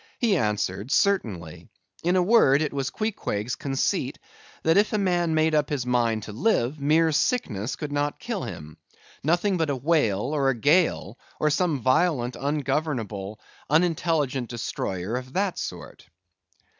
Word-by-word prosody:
He 225 -5 +2
answered, 105 - -1
certainly. 90 - 0 0.4
In 175 +2 +2
a 180 - +4
word, 165 - +5
it 150 - -3
was 135 -1 -1
Queequeg's 130 - -3
conceit, 135 -1 -1 0.5
that 160 - +3
if 205 +2 +3
a - - +2
man 175 -4 +1
made 155 0 +2
up 150 -2 +2
his 140 -4 -2
mind 120 -3 +1
to 105 - -7
live, 135 - 0
mere 160 +3 +3
sickness 135 - 0
could 150 -2 -6
not 145 0 -1
kill 230 -6 -4
him: 75 +1 -8 0.5
nothing 175 +6 +2
but 160 -3 0
a 140 - 0
whale, 130 -8 +1
or 140 -3 +2
a 135 - +1
gale, 145 - +2 0.2
or 150 - +2
some 155 -3 0
violent, 130 -2 +2
ungovernable, 135 -8 -2 0.3
unintelligent 155 -5 +1
destroyer 110 -3 -3
of 130 +1 -8
that 195 -1 -1
sort. - - -8
145 Hz, 150 wpm, -25 LUFS, 120-165 Hz, 0.5 s, word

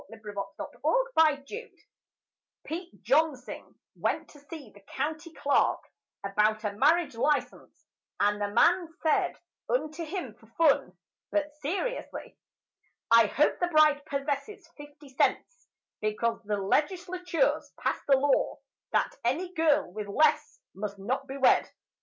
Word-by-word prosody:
THE 225 - -11
COLOURED 205 -2 -7
FORTUNE - - +2
HUNTER 315 +9 +1 0.9
Pete 345 +3 -7
Jonsing 285 -3 0 0.2
went - - -2
to 290 - -15
see 285 -5 -10
the 205 - -17
County 310 - -4
Clerk 285 -3 +1 0.4
About 210 +2 +1
a 205 -2 -2
marriage 300 +7 +3
license, 290 +5 -2 0.3
and 205 0 +2
the 205 - +1
man 340 - +3
Said 315 - +2 0.3
unto 330 -9 -1
him 320 - -5
for 225 - -22
fun, 315 -4 +3 0.3
but 300 -1 -1
seriously: 385 - -4 0.8
"I 230 -1 +7
hope 295 +8 +1
the 355 - +1
bride 305 -3 +4
possesses 290 +8 -3
fifty 290 0 -13
cents, - - -1 0.3
Because 225 +2 -1
the 210 0 -1
Legislature's 355 - 0
passed - - -2
a 275 - +7
law 280 +1 +1 0.4
That - - +1
any 335 +10 -1
girl 310 - +2
with 210 0 -5
less 380 - +2
must 200 0 -5
not 260 +8 -3
be 270 - -6
wed." 265 - +4
290 Hz, 130 wpm, -28 LUFS, 230-330 Hz, 0.9 s, I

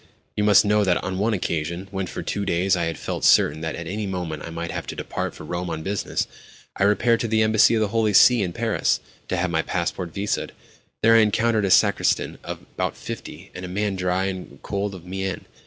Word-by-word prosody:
"You 105 - 0
must 105 0 +6
know 105 0 +3
that, 90 -3 +2
on 95 +1 -3
one 110 +2 +1
occasion, 85 +1 -3
when, 95 -2 -3
for - - -6
two 100 - -2
days, 95 +1 +2
I 85 -2 0
had 80 0 -3
felt - - -4
certain 75 +2 +4
that 80 0 -3
at 85 - -6
any 105 +4 -3
moment 90 -5 -4
I - - -7
might 85 0 -5
have - - -5
to - - -5
depart - - -4
for - - -10
Rome 85 +3 -4
on 80 -1 -4
business, 100 +2 -2 0.5
I 95 - +2
repaired 115 +3 +3
to 115 - -1
the 110 0 +2
Embassy 110 +1 +5
of 110 - +1
the 105 - +1
Holy 110 0 +1
See 120 +4 +7
in 90 -3 -1
Paris, - - 0 0.3
to 95 - -1
have 90 0 0
my 80 -1 +2
passport 85 0 -3
visaed. 100 +4 -2 0.5
There 115 +1 +6
I 115 - +7
encountered 110 0 +2
a - - 0
sacristan - - +2
of - - -6
about - - -2
fifty, - - -8
and 90 - -8
a - - -4
man 100 +2 -1
dry 90 0 0
and 95 -7 -6
cold 100 -1 -3
of 90 -2 -12
mien. 95 0 -4
95 Hz, 230 wpm, -23 LUFS, 85-105 Hz, 0.5 s, See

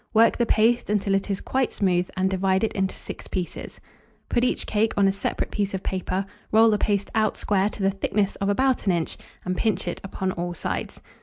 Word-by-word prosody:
Work 230 +2 +5
the 235 - +2
paste 235 +2 +3
until 205 -1 +1
it 195 +1 0
is 195 - -1
quite 265 -1 0
smooth, 180 -2 +1
and 190 0 +2
divide 190 +1 +1
it 220 - 0
into 190 -1 -1
six - - -8
pieces. 180 -2 -5 0.5
Put 240 - +2
each 250 - 0
cake 220 +1 +1
on 200 -1 +5
a - - +4
separate 200 - -2
piece 200 -1 -1
of 190 - -5
paper, 185 +1 -2 0.3
roll 225 +1 +6
the 210 - +1
paste 200 -1 0
out 215 -1 +1
square 200 0 +1
to 210 - -6
the 195 - +3
thickness 195 +1 0
of 195 - -1
about 260 +2 +1
an 190 - +4
inch, 170 -2 -1 0.3
and 185 0 -1
pinch 200 -2 0
it - - -3
upon 190 -1 -2
all 175 0 -4
sides. - - -4
195 Hz, 220 wpm, -25 LUFS, 190-215 Hz, 0.5 s, roll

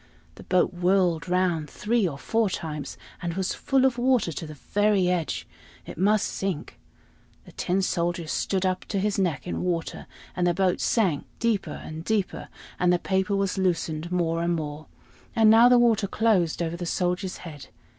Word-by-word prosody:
The - - -13
boat 185 -1 +2
whirled 180 -2 +1
round 180 -4 +1
three 220 -2 0
or 140 -5 -5
four 225 +7 0
times, 150 -5 -5 0.2
and 170 -2 -3
was 190 -1 -1
full 270 -1 +1
of 250 -2 +1
water 250 -7 +2
to 160 +1 -6
the 155 - -9
very 205 +3 +1
edge 170 -5 -2 0.4
it - - -8
must 205 +4 +2
sink. 190 -6 -4 0.7
The - - -14
Tin 190 +2 -1
Soldier 175 -2 -1
stood 190 +4 -1
up 185 0 0
to 205 - -3
his 205 +1 0
neck 175 -8 0
in 175 - -3
water, 170 -2 -3 0.3
and 175 0 +1
the 175 - +2
boat 185 -2 +1
sank 185 -11 +1
deeper 230 -4 -1
and 160 +1 -7
deeper, 210 0 -2 0.3
and 180 0 +3
the 180 - +4
paper 190 +3 0
was 195 -1 -1
loosened 170 -3 -1
more 165 -2 0
and 170 0 +1
more; 150 -1 -5 0.5
and 220 -2 +6
now 230 +2 +7
the 250 - +6
water 230 -4 +3
closed 190 -6 +1
over 165 0 -3
the 175 0 -5
soldier's 180 +2 -1
head. 150 -4 -9
180 Hz, 180 wpm, -26 LUFS, 170-205 Hz, 0.7 s, now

